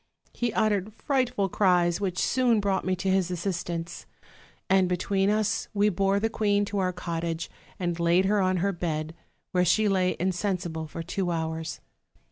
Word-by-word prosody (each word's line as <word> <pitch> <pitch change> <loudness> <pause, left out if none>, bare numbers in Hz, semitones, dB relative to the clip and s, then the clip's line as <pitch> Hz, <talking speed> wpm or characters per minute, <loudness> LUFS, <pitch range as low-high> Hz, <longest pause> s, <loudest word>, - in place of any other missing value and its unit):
He 240 -1 -1
uttered 215 -1 0
frightful 250 -8 0
cries, 180 -2 +2
which 185 -3 -2
soon 245 -1 +2
brought 200 -2 0
me 185 0 +1
to 190 +1 -2
his 190 -2 +2
assistance; 175 -2 -4 0.6
and 190 -1 +3
between 195 +2 +1
us 215 +1 0
we 205 +1 +4
bore 195 +1 +1
the 220 - +1
queen 205 -2 +1
to 205 0 -3
our 185 -1 +1
cot 170 -2 -4
tage, 165 0 -3 0.3
and 175 -2 -2
laid 170 +2 +3
her 205 +1 +2
on 185 0 +2
her 200 - +2
bed; 160 -3 -3 0.4
where 180 -1 +2
she 210 +5 +3
lay 185 -2 +2
insensible 180 -3 -2
for 165 +2 -6
two 180 +2 -2
hours. 160 -1 -3
185 Hz, 170 wpm, -27 LUFS, 175-205 Hz, 0.6 s, we